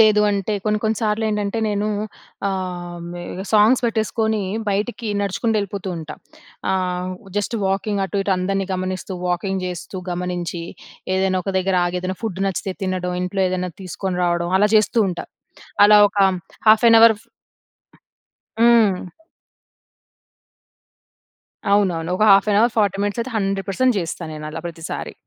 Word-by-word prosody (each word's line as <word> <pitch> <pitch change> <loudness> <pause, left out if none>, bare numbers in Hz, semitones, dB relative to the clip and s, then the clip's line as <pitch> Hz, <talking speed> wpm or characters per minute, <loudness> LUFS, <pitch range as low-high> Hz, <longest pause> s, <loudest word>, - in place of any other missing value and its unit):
లేదు 215 -1 +6
అంటే 200 +1 -1
కొన్ని 215 0 +1
కొన్ని 220 0 +1
సార్లెంటంటే 210 -1 0
నేను 205 0 -1 0.6
ఆహ్, 180 -2 -4
మి 175 - -7
ఇగ 190 - -6
సాంగ్స్ 220 +5 +5
బెట్టేసుకొని 220 -1 0 0.3
బయటికి 220 +3 -2
నడుచుకుంటెళ్ళిపోతూ 200 -1 -1
ఉంటా. 155 -1 -8 0.6
ఆహ్, 180 -1 -1 0.3
జస్ట్ 215 +3 -2
వాకింగ్ 195 +1 -1
అటు 200 +1 -2
ఇటు 200 - +1
అందరిని 195 +1 -1
గమనిస్తూ, 185 +1 -4
వాకింగ్ 190 +1 -1
జెస్తూ 180 +1 -6
గమనించి. 175 -1 -3 0.5
ఏదైనా 190 0 +1
ఒక - - -1
దగ్గర 190 0 0
ఆగి 180 +1 -2
ఏదైనా 185 0 -3
ఫుడ్ 190 -4 -3
నచ్చితే 195 0 -2
తినడం. 180 -1 -2
ఇంట్లో 185 +2 -2
ఏదైనా 180 0 -2
తీసుకొని 180 +1 -4
రావడం. 175 0 0
అలా 210 +1 +4
జెస్తూ 215 +2 +2
ఉంటా. 175 - -4 0.6
అలా 210 0 +7
ఒక 205 - -5 0.5
హాఫ్ 215 +2 +6
ఎన్ 230 - +8
అవర్. 225 -1 +7
ఫ్ - - -28 1.3
హ్మ్. 230 -4 +6 2.8
అవునవును. 180 -5 +1
ఒక 215 - +2
హాఫ్ 195 +2 +6
యన్ 205 - +3
అవర్, 235 +1 +3
40 200 -2 +2
మినిట్స్ 205 +3 -1
అయితే 245 +3 -4
100% 195 +5 0
జెస్తా 170 0 -4
నేను 155 0 -7
అలా 165 - -6
ప్రతిసారి. 165 -1 -6
195 Hz, 140 wpm, -21 LUFS, 180-210 Hz, 2.8 s, ఎన్